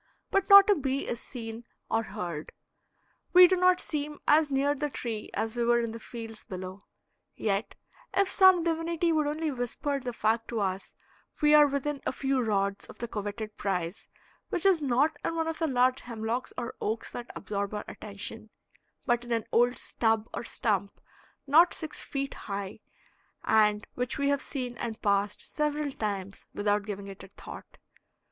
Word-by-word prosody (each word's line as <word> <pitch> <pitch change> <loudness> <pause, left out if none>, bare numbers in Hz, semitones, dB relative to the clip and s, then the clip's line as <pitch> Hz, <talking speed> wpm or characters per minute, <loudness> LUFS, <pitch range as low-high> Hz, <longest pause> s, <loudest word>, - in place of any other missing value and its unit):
But 390 +1 +1
not 400 -1 +10
a 415 - +6
bee 275 -5 -2
is 240 - -2
seen 230 -2 -7 0.2
or 225 - +1
heard; 170 -8 -5 0.8
we 365 0 +10
do 370 +1 +4
not 365 0 +4
seem 300 -1 -3
as 305 0 +5
near 280 +1 +2
the 295 +1 -2
tree 230 -5 -5
as 225 +1 -2
we 240 - 0
were 240 0 +4
in 230 -1 -2
the 230 - -7
fields 225 -1 -7
below; 185 +1 -8 0.5
yet 205 +1 -1 0.4
if 395 0 +3
some 375 -2 +6
divinity 335 0 0
would 305 -2 +2
only 310 +1 -1
whisper 275 +3 -2
the 250 -2 -4
fact 225 0 0
to 230 - -2
us 195 -1 -2 0.4
we 300 0 +5
are 300 -1 +8
within 280 0 -2
a - - -1
few 270 0 0
rods 200 -3 0
of - - -12
the 235 - -4
coveted 210 0 -5
prize, 180 -2 -2 0.4
which 350 - -2
is 375 -5 +5
not 285 +3 +2
in 330 - -1
one 325 -1 0
of 325 -1 -3
the 325 - +1
large 255 -1 +2
hemlocks 230 +1 -3
or 235 - -4
oaks 220 +2 -2
that 240 0 -7
absorb 200 -1 -3
our 210 - -4
attention, 215 +2 -6 0.6
but 240 -1 +1
in 240 - -9
an 230 -2 0
old 245 +1 +3
stub 225 -1 0
or - - -4
stump 200 -4 -1 0.5
not 320 +5 +5
six 315 -1 -4
feet 275 -1 -3
high, 200 0 -6 0.6
and 210 -1 +3
which 250 -1 -2
we 280 0 +1
have 280 -1 +1
seen 250 -3 -4
and 225 -2 -4
passed 200 0 +1
several 300 -1 -1
times 200 -5 -4
without 205 0 +1
giving 200 -1 -5
it 195 -1 -9
a - - -10
thought. 195 - -11
240 Hz, 180 wpm, -29 LUFS, 210-295 Hz, 0.8 s, not